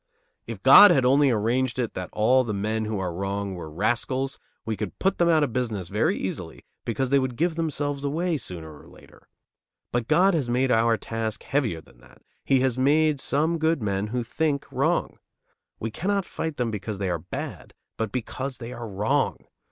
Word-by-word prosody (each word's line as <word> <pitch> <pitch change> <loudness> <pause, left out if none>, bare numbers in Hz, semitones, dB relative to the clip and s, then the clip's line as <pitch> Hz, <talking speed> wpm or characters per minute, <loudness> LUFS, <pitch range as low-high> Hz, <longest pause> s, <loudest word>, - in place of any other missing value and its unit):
If - - -7
God 205 - +10
had 130 -2 +3
only 140 +2 +5
arranged 120 +3 0
it 120 -3 -2
that 90 -1 -5
all 125 +5 +3
the 110 -4 -3
men 110 +2 -1
who 110 -1 -2
are 90 -2 -3
wrong 100 +2 -3
were 85 -3 -7
rascals, 120 - -1 0.3
we 110 0 -2
could 105 -2 -5
put 195 - 0
them 170 -1 +4
out 160 -2 +4
of 130 -6 -2
business 110 -8 -2
very - - +1
easily, - - -5 0.2
because 125 +3 -1
they 140 - +5
would 130 -2 -2
give 170 +5 +1
themselves 145 -3 -2
away 160 +4 0
sooner 85 - -7
or - - -17
later; - - -18 0.6
but 120 -1 -1
God 190 +2 +4
has 145 -7 0
made 125 +2 +1
our 115 0 +3
task 110 +1 -4
heavier 120 - -1
than - - -22
that, - - -20 0.2
he 135 -2 +3
has 130 -1 0
made 150 +2 +3
some 160 +5 0
good 160 0 +2
men 100 0 -1
who 120 +2 -2
think 145 +3 -1
wrong. 140 +7 0 0.6
We 115 - -3
cannot 195 - -1
fight 160 -2 -4
them 120 -2 -1
because 105 0 -4
they 95 -2 -1
are 85 - -1
bad, - - -7 0.2
but 110 -2 -2
because 130 +3 -4
they 120 0 -7
are 120 -2 -6
wrong. 105 +9 0
125 Hz, 195 wpm, -25 LUFS, 105-145 Hz, 0.6 s, God